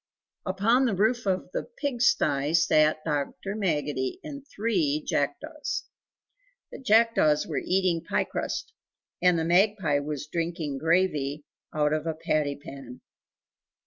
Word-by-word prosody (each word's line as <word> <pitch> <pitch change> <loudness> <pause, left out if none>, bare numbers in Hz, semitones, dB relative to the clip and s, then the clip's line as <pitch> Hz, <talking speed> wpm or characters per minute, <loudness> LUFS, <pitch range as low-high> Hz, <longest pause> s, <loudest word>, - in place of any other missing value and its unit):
Upon 220 +8 +3
the 225 -6 +1
roof 220 +3 +1
of 185 -1 -1
the - - -2
pig 285 - -4
stye 145 - +2
sat 155 -1 +3
Dr. 150 +6 -2
Maggotty 150 -10 -1
and 285 -3 -8
three 185 - 0
jackdaws. 300 - -2 0.9
The - - -8
jackdaws 225 - +3
were - - -3
eating 180 -3 +1
pie - - 0
crust, 450 - -4 0.5
and 180 -1 +4
the 160 - 0
magpie 180 -4 +3
was 145 -1 -4
drinking 165 -3 -3
gravy 155 -4 +1 0.3
out 150 0 +1
of 155 +1 -2
a 160 - -1
patty 150 -2 0
pan. 135 -3 -11
165 Hz, 130 wpm, -27 LUFS, 150-210 Hz, 0.9 s, and